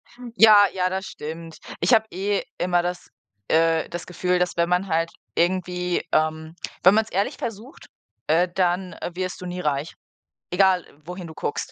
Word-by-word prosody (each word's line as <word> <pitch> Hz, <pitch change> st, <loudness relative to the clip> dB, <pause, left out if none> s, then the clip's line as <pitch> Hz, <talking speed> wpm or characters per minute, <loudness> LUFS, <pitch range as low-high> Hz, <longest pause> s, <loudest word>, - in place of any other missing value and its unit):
Hm. 245 Hz, -1 st, -10 dB
Ja, 210 Hz, -2 st, +8 dB
ja, 185 Hz, -1 st, 0 dB
das 190 Hz, +1 st, -3 dB
stimmt. 165 Hz, +2 st, -8 dB, 0.2 s
Ich -, -, +3 dB
habe 220 Hz, -1 st, +5 dB
eh 200 Hz, +2 st, -1 dB
immer 175 Hz, 0 st, +2 dB
das, 175 Hz, 0 st, -4 dB, 0.4 s
äh 165 Hz, 0 st, +2 dB
das 175 Hz, 0 st, -6 dB
Gefühl, 180 Hz, 0 st, 0 dB
dass 180 Hz, -1 st, 0 dB
wenn 170 Hz, 0 st, +2 dB
man 180 Hz, +2 st, +1 dB
halt 165 Hz, 0 st, 0 dB, 0.2 s
irgendwie, 180 Hz, 0 st, 0 dB
ähm 155 Hz, +1 st, 0 dB, 0.3 s
wenn 185 Hz, -, +8 dB
man's 220 Hz, +1 st, +2 dB
ehrlich 195 Hz, +3 st, -1 dB
versucht, 230 Hz, +4 st, -7 dB, 0.4 s
äh, 170 Hz, +4 st, +3 dB
dann 180 Hz, 0 st, 0 dB, 0.2 s
wirst 185 Hz, +1 st, -4 dB
du -, -, -6 dB
nie 180 Hz, 0 st, -5 dB
reich, 150 Hz, 0 st, -1 dB, 0.6 s
egal 185 Hz, -1 st, +3 dB, 0.2 s
wohin 180 Hz, 0 st, -7 dB
du 160 Hz, -, -10 dB
guckst. -, -, -4 dB
180 Hz, 170 wpm, -24 LUFS, 165-190 Hz, 0.6 s, Ja